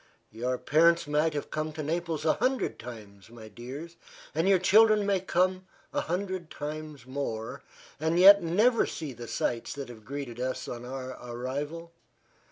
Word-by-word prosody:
Your 125 +3 -2
parents 170 +5 +4
might 150 +1 +1
have 145 - -4
come 155 0 -2
to 155 -1 -5
Naples 165 0 -2
a 155 - +5
hundred 255 +3 0
times, 105 -4 -10
my 115 -2 -11
dears, 135 +10 -8 0.4
and 165 +5 +2
your 195 - +6
children 215 +3 +5
may 200 -1 +2
come 185 +1 0 0.3
a - - +1
hundred 185 -1 -3
times 150 -3 -6
more, 120 -4 -4 0.4
and 160 +2 +1
yet 200 +3 +9
never 210 +9 +3
see 150 -5 -5
the 120 0 -9
sights 115 +1 -2
that 140 -2 -6
have 110 -3 -11
greeted 135 -1 -6
us 130 +1 -3
on 120 0 -6
our 130 0 -5
arrival. 140 +7 -5
150 Hz, 165 wpm, -29 LUFS, 125-175 Hz, 0.4 s, yet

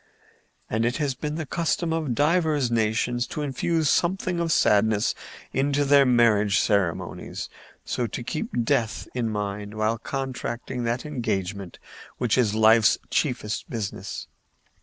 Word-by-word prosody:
And 110 +1 0
it 120 +2 0
has 145 -3 0
been 150 +4 -4
the 160 -1 -3
custom 165 +2 -1
of 155 -7 -1
divers 150 -4 +2
nations 115 +2 0
to 150 - -4
infuse 155 +3 0
something 180 +2 +1
of 170 -1 0
sadness 105 -4 +3 0.4
into 140 +2 +1
their 140 -1 +5
marriage 105 -5 +4
ceremonies, 100 -5 -1 0.4
so - - -1
to - - -5
keep 120 - -2
death 115 -3 0
in 120 -3 -1
mind 105 0 -4
while 110 +1 0
contracting 125 -2 -4
that 120 +4 -1
engagement 100 - -3 0.4
which 120 -4 +1
is 110 -5 +2
life's 110 0 +5
chiefest 120 -7 -1
business. 110 -6 -5
120 Hz, 135 wpm, -25 LUFS, 110-145 Hz, 0.4 s, their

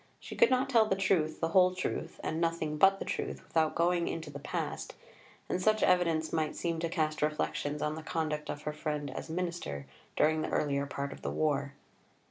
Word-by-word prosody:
She - - -8
could - - +6
not 260 +1 +2
tell 230 -5 +4
the 195 - +2
truth, 175 -5 +1
the 165 - +1
whole 185 +1 +5
truth, 185 - -3
and 160 +1 -2
nothing 165 -2 0
but 195 +2 +6
the - - -5
truth - - -3
without 160 -1 +1
going 170 0 +2
into 160 -2 -4
the 140 - -7
past, - - -4 0.5
and 185 - -1
such 215 +2 +3
evidence 165 -3 +2
might 155 -2 0
seem 165 -1 -2
to 165 0 -1
cast 155 -2 -1
reflections 150 -1 -1
on 150 - 0
the 160 - -6
conduct 155 -2 -2
of 145 - -4
her 150 - -3
friend 150 -2 -3
as 130 - -6
Minister 170 - -3 0.3
during 155 0 +3
the - - -2
earlier 140 -1 0
part 140 0 -4
of - - -13
the - - -2
war. 140 -2 0
160 Hz, 205 wpm, -31 LUFS, 150-180 Hz, 0.5 s, could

